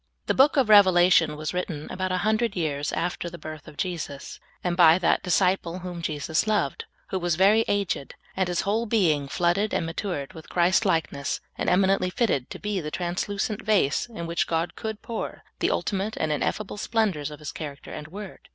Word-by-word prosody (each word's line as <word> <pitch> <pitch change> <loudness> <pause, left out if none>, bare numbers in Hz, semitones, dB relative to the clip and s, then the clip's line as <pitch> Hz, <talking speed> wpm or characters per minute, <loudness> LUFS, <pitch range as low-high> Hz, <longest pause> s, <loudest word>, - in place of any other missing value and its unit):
The - - +1
book 285 +3 +4
of 265 -4 +4
Revelation 180 -6 +6
was 155 0 -4
written 170 -4 -3
about 185 0 -2
a 185 - +1
hundred 220 0 +1
years 145 -4 -1
after 175 0 -2
the 175 - -9
birth 155 -3 -9
of 145 - -12
Jesus, 160 -6 -4 0.2
and 175 -1 0
by 170 -2 +7
that 180 - +2
Disciple 180 -1 +1
whom 175 -1 -5
Jesus 155 +3 -1
loved, 205 -10 0 0.2
who 190 - -1
was 175 -2 0
very 200 +5 +5
aged, 200 -8 -1 0.2
and 190 -1 +1
his 175 -1 0
whole 220 +4 0
being 165 -11 +2
flooded 175 +7 +1
and - - 0
matured 165 -3 -4
with 160 -3 -12
Christ 180 +4 +3
likeness, 160 -5 0 0.2
and - - -1
eminently 190 0 +3
fitted 180 - 0
to - - -7
be 210 -2 -2
the 150 - -4
translucent 200 +5 -2
vase 205 - +2
in 190 -8 -7
which 170 +1 -1
God 165 +1 -1
could 220 -1 -5
pour 230 -2 -5 0.2
the - - +2
ultimate 200 +2 -1
and 155 - 0
ineffable 195 +8 -2
splendors 205 -10 0
of 150 - -9
His 150 0 -6
character 145 -2 -8
and 150 - -7
word. 195 +3 -10
180 Hz, 190 wpm, -26 LUFS, 160-205 Hz, 0.2 s, by